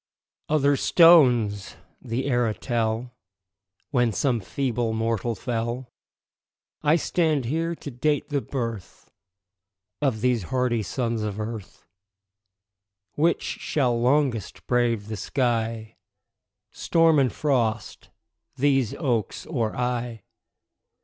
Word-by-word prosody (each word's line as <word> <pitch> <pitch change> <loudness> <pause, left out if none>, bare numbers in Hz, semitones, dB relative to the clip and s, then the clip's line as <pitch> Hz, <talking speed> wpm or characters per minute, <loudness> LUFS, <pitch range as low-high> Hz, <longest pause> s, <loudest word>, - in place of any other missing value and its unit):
Other 145 -2 +3
stones 125 - +5 0.3
the 125 +1 -3
era 120 -5 +1
tell 120 0 -2 0.8
When 120 -4 +2
some 120 +1 0
feeble 120 +2 -2
mortal 115 0 -1
fell; 120 +2 -4 0.9
I 150 +1 +4
stand 155 -4 +1
here 165 +6 -1
to 145 - -8
date 145 +4 -1
the 145 -2 0
birth 115 -9 -6 0.9
Of 130 -7 0
these 125 -2 +2
hardy 125 +2 0
sons 115 0 -2
of 105 -1 -4
earth. 110 -2 -7 1.3
Which 165 +3 +1
shall 125 -5 -1
longest 130 -4 0
brave 120 -4 +1
the 110 -1 -5
sky, 115 -1 -2 0.7
Storm 165 -2 +3
and 130 -4 +2
frost 115 -7 -1 0.5
these 135 -4 +1
oaks 120 - -2
or 115 -8 -2
I? 125 -3 -2
120 Hz, 105 wpm, -25 LUFS, 115-140 Hz, 1.3 s, stones